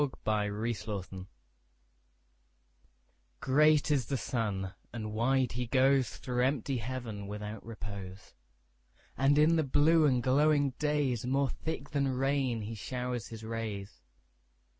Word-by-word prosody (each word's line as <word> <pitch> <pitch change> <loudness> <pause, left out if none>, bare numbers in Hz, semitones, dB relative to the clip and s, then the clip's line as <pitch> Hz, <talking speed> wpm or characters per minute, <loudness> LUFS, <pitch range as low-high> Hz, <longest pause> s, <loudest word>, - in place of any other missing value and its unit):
Summer 105 +2 0
Sun 95 -3 -6 2.1
GREAT 150 +3 +4
is 135 -6 +1
the 135 - -1
sun, 100 -6 -2 0.2
and 110 -2 -5
wide 130 +3 +2
he 125 +1 -3
goesThrough 130 -1 +2
empty 135 0 0
heaven 115 -4 -5
without 105 +1 -6
repose; 100 -4 -8 0.8
And 135 +3 +3
in 160 +2 +5
the 160 - +3
blue 155 +3 +4
and 125 -3 +2
glowing 145 +1 +3
daysMore 135 -3 +1
thick 160 -3 -5
than 140 -1 +1
rain 130 -2 0
he 110 +2 -5
showers 125 0 -4
his 110 -1 -9
rays. 110 -3 -5
125 Hz, 115 wpm, -31 LUFS, 110-140 Hz, 2.1 s, in